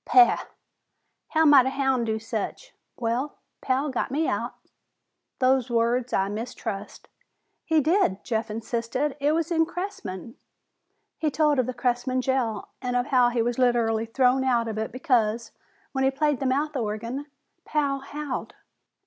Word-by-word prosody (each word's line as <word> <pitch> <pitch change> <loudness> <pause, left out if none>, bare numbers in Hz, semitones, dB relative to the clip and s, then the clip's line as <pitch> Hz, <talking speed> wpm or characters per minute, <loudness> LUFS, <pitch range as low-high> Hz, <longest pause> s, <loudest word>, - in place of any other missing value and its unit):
"Pah! 370 -1 +5 0.8
How 320 0 +2
might 280 -4 +7
a - - +2
houn' 265 -3 +1
do 220 -1 0
such?" 225 - -5 0.2
"Well, 245 +5 -1 0.3
Pal 270 +2 0
got 260 - -1
me 305 +4 0
out." - - -2 0.8
"Those 255 -1 +2
words 235 +1 +1
I 195 - +2
mistrust." 210 -1 -5 0.6
"He 320 -2 +3
did," 310 - +2
Jeff 225 -2 -2
insisted. 235 +5 -2
"It 290 +2 +2
was 330 +1 -1
in 325 -1 +4
Cressman 330 - -6 0.4
" - - -50
He 315 - +1
told 300 -1 +2
of 255 - +1
the 255 - -2
Cressman 250 +1 0
jail 240 -5 -1
and 250 -1 -2
of 245 0 +2
how 250 -1 +6
he 240 -1 +1
was 240 +1 -1
literally 230 -3 +2
thrown 255 +2 +3
out 240 -3 +2
of 215 -1 -3
it 220 - -3
because, 235 -4 +1 0.4
when 265 -1 -1
he 265 - +5
played 290 0 0
the 270 - 0
mouth 290 +4 0
organ, 235 +4 -3 0.4
Pal 285 -2 0
howled. 285 0 -5
255 Hz, 155 wpm, -26 LUFS, 230-285 Hz, 0.8 s, might